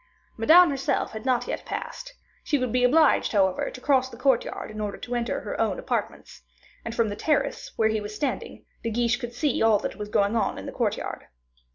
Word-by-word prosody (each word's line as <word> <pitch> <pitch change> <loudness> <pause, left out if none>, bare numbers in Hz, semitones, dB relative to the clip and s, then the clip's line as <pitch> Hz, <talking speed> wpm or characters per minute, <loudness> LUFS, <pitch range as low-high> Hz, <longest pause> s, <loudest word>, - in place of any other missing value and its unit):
Madame 320 +9 +6
herself 270 -1 -1
had 220 +3 -7
not 255 -2 +1
yet - - -4
passed; - - -6 0.3
she 295 - +1
would 255 -3 -2
be 250 +1 +1
obliged, 295 +2 +4
however, 190 -3 +2
to - - -10
cross 260 -1 +2
the 235 - -11
courtyard 255 -4 0
in 215 0 -6
order 205 -1 -3
to 245 - -6
enter 240 -1 -1
her - - -4
own - - 0
apartments; - - -4 0.4
and, 230 - -5
from 230 -2 +2
the 205 - -4
terrace 305 +6 -1
where 220 -1 +2
he 220 -1 -1
was 210 +1 -7
standing, 285 - -4 0.2
De 230 - -2
Guiche 240 +2 +1
could 240 -1 -7
see 285 +1 0
all 225 -2 +5
that 205 - -5
was 210 -1 -6
going 200 +1 +2
on 215 -4 0
in - - -7
the - - -5
courtyard. - - -3
240 Hz, 215 wpm, -26 LUFS, 215-265 Hz, 0.4 s, Madame